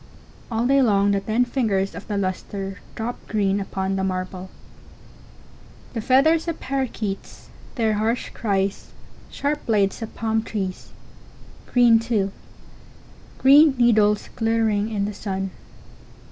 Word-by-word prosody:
All 230 0 0
day 275 +2 +4
long 200 -4 +3
the 200 - +2
ten 220 +5 +1
fingers 210 -7 0
of - - -9
the 205 - -2
lustre 195 +1 -4 0.2
drop 230 +2 -4
green 200 -2 +1
upon 195 0 -2
the 190 - -1
marble. 185 0 -3 1.4
The 230 - -3
feathers 300 +8 +3
of 335 - -3
parakeets—their 230 -2 -4
harsh 220 +3 -1
cries—sharp 205 +8 -3
blades 205 -2 +1
of 225 - -7
palm 220 -1 0
trees—green, 225 +3 -1
too; 220 -4 0 1.1
green 285 +2 +6
needles 215 -4 +3
glittering 225 -2 +1
in 205 -3 -1
the 210 - -4
sun. 195 -2 -4
215 Hz, 115 wpm, -23 LUFS, 195-240 Hz, 1.4 s, green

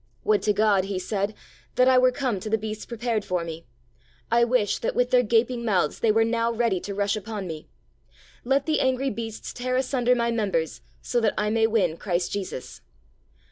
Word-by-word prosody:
"Would 215 -1 +2
to 210 - +2
God," 205 -2 +3
he 195 -1 -3
said, 200 +2 -2 0.4
"that 255 - +4
I 260 -1 +6
were 255 0 +4
come 250 -6 -2
to 215 - -6
the 220 - +2
beasts 215 0 -6
prepared 235 -2 -2
for 180 -3 -1
me. 165 0 -7 0.7
I 235 +1 +4
wish 235 -4 +1
that, - - -2
with 245 +1 +1
their 250 -1 +6
gaping 235 +1 +1
mouths, 185 -9 +1
they 225 - +3
were 225 +1 +3
now 230 0 0
ready 230 -5 +1
to 200 +2 -6
rush 200 +1 +1
upon 215 -1 -5
me. 160 -3 -7 0.8
Let 270 +2 +1
the 315 - +1
angry 260 +1 +1
beasts 225 0 -6
tear 255 +1 -2
asunder 255 -1 +2
my 235 -1 0
members 195 -8 -1 0.2
so 245 - 0
that 220 - +1
I 210 0 0
may 225 0 +3
win 190 -8 +1
Christ 180 -2 -1
Jesus." 190 -10 -5
220 Hz, 200 wpm, -25 LUFS, 200-245 Hz, 0.8 s, I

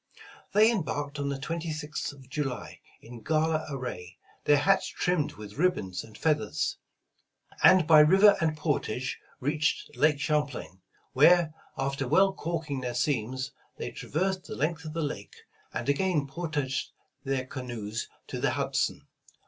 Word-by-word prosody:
They 215 +3 +6
embarked 145 -8 -2
on 140 0 -1
the 140 - -2
26th 155 0 -4
of 135 -2 -15
July, 135 -3 -4 0.2
in 120 0 -10
gala 155 +4 +1
array, 95 -10 -6 0.3
their 145 - +6
hats 195 +7 +3
trimmed 175 -4 0
with 105 +4 -10
ribbons 160 - 0
and 110 -1 -13
feathers; 150 -9 0 0.8
and 185 -4 +7
by 155 -1 +8
river 190 +7 +7
and 155 -2 +1
portage 130 -5 -1 0.2
reached 150 +3 -1
Lake 150 -1 +3
Champlain, 140 - -2 0.3
where 175 -3 +5 0.2
after 135 0 -1
"well 195 +8 +4
calking 160 -6 -3
their 125 -1 -3
seams," 130 0 -1 0.3
they - - -4
traversed 185 +4 -2
the - - -6
length 160 +3 -1
of 155 - -6
the 165 0 -1
Lake, 125 -9 -5 0.4
and - - -4
again 150 +1 +2
portaged 145 -3 -3 0.3
their 135 -1 -1
canoes 120 -4 -5 0.2
to - - -5
the - - +3
Hudson. - - -1
145 Hz, 140 wpm, -28 LUFS, 130-160 Hz, 0.8 s, by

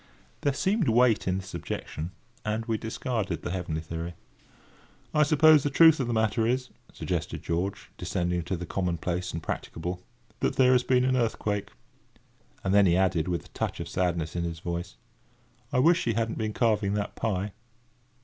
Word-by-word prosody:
There 145 - +2
seemed 190 - +1
weight 120 -2 +4
in 90 0 +1
this 95 0 -7
objection, 80 +3 -5 0.3
and 110 +1 -2
we 115 -2 -1
discarded 110 -1 -3
the 90 - -3
heavenly 85 -4 -3
theory. 85 +1 -5 1.0
"I 150 - +3
suppose 155 0 +6
the 145 - 0
truth 160 +2 +6
of 130 - 0
the - - -1
matter 110 0 +2
is," 125 +1 0 0.2
suggested - - -3
George, 95 +5 -2
descending 90 -1 -1
to 90 +1 -2
the 90 - -5
commonplace 90 0 -2
and 80 0 -5
practicable, 90 +3 -4 0.4
"that - - 0
there 130 -1 +5
has 125 -1 +5
been 125 0 +2
an 130 0 +2
earthquake." 110 -4 -1 0.9
And 95 - +1
then 100 -1 +6
he 85 0 +4
added, 90 -4 +2
with 85 -2 -2
a - - -16
touch - - -3
of - - -4
sadness 85 -3 -1
in 85 - -1
his 85 -1 -3
voice: 85 -5 -4 0.8
"I 140 - 0
wish 165 +7 +4
he 115 - +1
hadn't 115 +1 -1
been 110 -1 -1
carving 105 -4 +1
that 105 -1 -3
pie." 105 -2 -1
105 Hz, 180 wpm, -28 LUFS, 90-125 Hz, 1.0 s, suppose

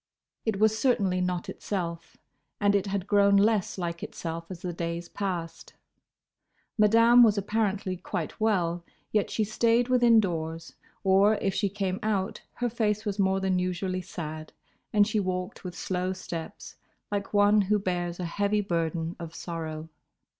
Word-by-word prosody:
It 210 -3 0
was 220 0 +4
certainly 195 -8 +2
not 180 -1 -2
itself, 170 -4 -5 0.4
and 205 -1 +3
it 200 0 +1
had 195 -1 -2
grown 200 -1 +4
less 205 -1 +2
like 170 -2 -3
itself 165 0 -6
as 180 -2 -8
the 180 -1 -3
days 170 0 -4
passed. 175 -4 -5 1.0
Madame 230 +3 +6
was 220 -3 +6
apparently 200 -2 -1
quite 175 - -5
well, 175 -6 +1 0.3
yet 210 -2 +1
she 220 - 0
stayed 230 +3 +2
within 240 -3 +5
doors, 165 -4 -3 0.3
or, 195 +3 +5
if 195 -2 -1
she 200 - 0
came 190 -1 -2
out, 205 -3 -1
her 245 - -1
face 215 -2 0
was 205 -1 -3
more 190 0 +2
than 190 -1 +1
usually 185 +1 -2
sad, 155 -3 -7 0.4
and 210 -1 +5
she 215 -1 0
walked 185 0 -3
with 180 -1 -7
slow 185 0 -2
steps, 170 -3 -7 0.3
like 200 -1 -2
one 205 0 +5
who 205 +2 +2
bears 175 -3 -2
a 180 - -2
heavy 205 +4 0
burden 165 -2 -2
of 165 -1 -8
sorrow. 160 -2 -5
190 Hz, 155 wpm, -27 LUFS, 175-210 Hz, 1.0 s, Madame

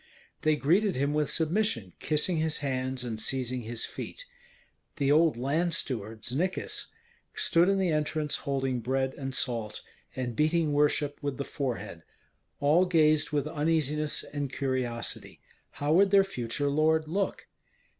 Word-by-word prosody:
They 155 0 +3
greeted 180 +7 +2
him 140 +2 0
with 150 -1 +1
submission, 160 - 0
kissing 155 +3 +1
his 160 0 +1
hands 130 -1 -2
and 110 -3 -3
seizing 130 0 -1
his 115 0 -2
feet. - - -7 0.7
The 140 -3 +1
old 155 -3 +4
land 155 +7 0
steward, 110 -3 -4
Znikis, 170 +10 -2 0.5
stood 170 +2 +3
in 195 - +3
the 185 -3 +1
entrance 150 -1 0
holding 135 -3 -1
bread 130 +3 -1
and 135 -1 -4
salt, 115 -4 -1 0.3
and 125 -3 -3
beating 155 +2 +2
worship 145 0 +1
with 140 -3 -3
the 140 - -3
forehead; 105 - -4 0.6
all 155 +6 +4
gazed 155 -4 +3
with 145 -2 0
uneasiness 150 -1 0
and 145 -2 -4
curiosity, 130 -3 -3 0.3
how 145 +2 0
would 195 +3 +5
their 195 0 +6
future 145 -6 -2
lord 155 +1 +2
look? 195 +5 -2
145 Hz, 145 wpm, -29 LUFS, 130-160 Hz, 0.7 s, their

